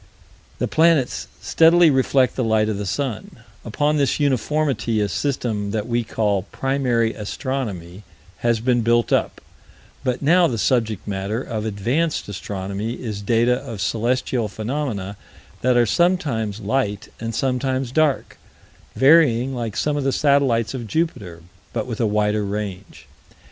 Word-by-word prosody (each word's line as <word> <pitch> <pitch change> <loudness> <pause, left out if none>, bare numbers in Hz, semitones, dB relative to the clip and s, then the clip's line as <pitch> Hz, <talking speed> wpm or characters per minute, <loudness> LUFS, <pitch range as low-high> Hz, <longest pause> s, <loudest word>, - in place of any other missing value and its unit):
The - - -1
planets 160 -5 +2
steadily 165 0 +5
reflect 130 -1 +2
the 130 - -1
light 110 -1 +2
of 105 -2 -2
the 100 - -4
sun: 115 +1 -4 0.2
upon 145 +6 0
this 140 0 +1
uniformity 135 -4 0
a 105 - +1
system 110 -2 -2
that 105 +1 -2
we 120 0 0
call 105 -3 -1
Primary 125 -4 0
Astronomy 105 - -5 0.4
has 120 -1 +1
been 120 0 +2
built 120 +1 +2
up; - - 0 0.6
but 125 0 -1
now 170 +4 +5
the 120 - -2
subject 110 -3 0
matter 100 +2 -2
of 110 -2 -4
Advanced 125 +11 -1
Astronomy 100 +2 -4
is 110 -5 -5
data 120 +4 +2
of 115 -4 -8
celestial 120 +2 0
phenomena 110 -2 -4 0.4
that 125 0 +3
are 120 - +5
sometimes 115 - 0
light 105 -2 -1
and 115 0 -4
sometimes 130 -1 -1
dark, 155 -1 0 0.6
varying 135 -1 +4
like 115 -4 -4
some 150 -1 0
of 145 - -1
the 135 - +1
satellites 130 -6 +2
of 120 -4 -5
Jupiter, 105 - -3 0.3
but 110 -2 -2
with 120 -2 -4
a 115 - +2
wider 105 0 +1
range. 100 -1 -5
120 Hz, 145 wpm, -21 LUFS, 105-135 Hz, 0.6 s, steadily